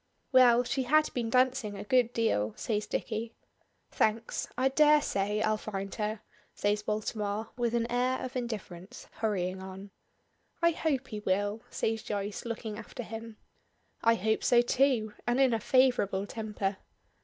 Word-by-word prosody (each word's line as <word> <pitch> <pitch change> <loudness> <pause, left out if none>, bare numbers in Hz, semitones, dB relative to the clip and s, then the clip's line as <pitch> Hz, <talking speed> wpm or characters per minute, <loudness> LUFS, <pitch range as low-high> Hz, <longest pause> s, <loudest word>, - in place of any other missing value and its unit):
"Well, 250 -2 +6
she 255 +2 -1
had 305 +5 +3
been 235 -2 -2
dancing 255 -4 +2
a - - -6
good 240 +2 +3
deal," 110 - 0
says 210 -2 -2
Dicky. 225 0 -3 0.6
"Thanks. 220 +1 0
I 260 +1 +3
dare 300 +2 +5
say 210 -4 -1
I'll 215 0 +2
find 195 -2 -5
her," 215 0 -3 0.3
says 205 +1 +1
Baltimore, 210 0 -2
with 240 -1 0
an 230 -1 +1
air 250 +1 +1
of 255 - -8
indifference, 220 -4 -6
hurrying 190 -4 -1
on. 190 +1 -9 0.7
"I 340 0 +4
hope 300 -5 -1
he 215 -3 -5
will," 205 +2 0
says 225 0 -1
Joyce, 205 +1 -4
looking 220 -2 -4
after 245 - -7
him. 225 0 -8 0.7
"I 230 0 +5
hope 220 +1 0
so 240 -1 +5
too 240 -4 +2
and 240 +2 +2
in 265 -3 +4
a 225 - +1
favorable 245 -7 +2
temper." 210 -3 -3
225 Hz, 155 wpm, -30 LUFS, 210-250 Hz, 0.7 s, Well